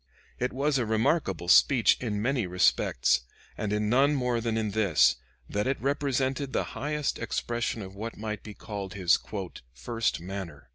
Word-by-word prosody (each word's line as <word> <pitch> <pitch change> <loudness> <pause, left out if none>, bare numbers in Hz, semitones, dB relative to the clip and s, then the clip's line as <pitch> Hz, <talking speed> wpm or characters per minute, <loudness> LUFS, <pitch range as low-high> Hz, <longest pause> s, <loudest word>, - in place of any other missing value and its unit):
] - - -31
It 125 +1 0
was 140 +1 +1
a 120 - 0
remarkable 110 - 0
speech 120 +6 +6
in 105 -4 -2
many 125 -5 0
respects 75 -8 +2 0.3
and 105 -1 -3
in 105 0 0
none 135 +6 +4
more 125 -3 0
than 115 -1 -1
in 110 -2 -1
this, 75 - +3 0.3
that 105 +3 -1
it 135 - 0
represented 135 0 -1
the - - +1
highest 150 0 -2
expression 115 0 -2
of 95 0 -9
what 110 +3 -6
might 105 -1 -4
be 105 -2 -10
called 100 -3 -6
his 90 -3 +4 0.6
"first 115 - -1
manner." 85 -7 -7
110 Hz, 170 wpm, -28 LUFS, 100-130 Hz, 0.6 s, speech